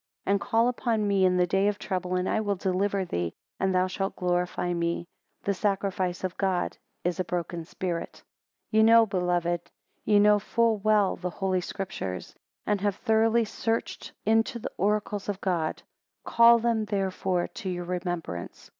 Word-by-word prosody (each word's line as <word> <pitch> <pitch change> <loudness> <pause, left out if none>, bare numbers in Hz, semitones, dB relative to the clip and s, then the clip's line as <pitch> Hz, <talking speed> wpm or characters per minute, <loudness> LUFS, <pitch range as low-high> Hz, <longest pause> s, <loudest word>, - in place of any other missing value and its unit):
And 200 +1 +2
call 230 -1 +2
upon 230 -3 0
me 195 -2 +3
in 180 0 +3
the 180 - +4
day 195 +3 +2
of 205 -1 0
trouble, 185 -2 -2
and 180 0 0
I - - +1
will 205 -2 0
deliver 190 +1 0
thee, 85 - -3 0.2
and 190 - +1
thou 185 0 +4
shalt 195 +1 -3
glorify 180 -1 -1
me. 170 0 -1 0.4
The 200 - +1
sacrifice 195 -2 -1
of 185 -1 -2
God 190 -3 0 0.3
is 175 0 -1
a - - +2
broken 175 -1 -4
spirit. 175 -1 -5 0.5
10 220 - +3
Ye - - +7
know, 225 +1 +7
beloved, 175 -3 -1 0.3
ye 210 -1 +4
know 210 0 +5
full 230 +2 +1
well, 210 -1 +2
the 180 +1 -3
Holy 185 0 -1
Scriptures; 175 - -5 0.3
and 210 -2 0
have 205 -1 +1
thoroughly 225 +2 +2
searched 225 +2 -3
into 225 +2 +2
the 235 - -6
oracles 205 0 -1
of 200 -1 -2
God: 175 -5 -1 0.4
call 235 0 +6
them 230 -1 0
therefore 190 -3 -1
to 190 - -6
your 175 -1 -3
remembrance. 175 - -5
190 Hz, 170 wpm, -27 LUFS, 180-210 Hz, 0.5 s, Ye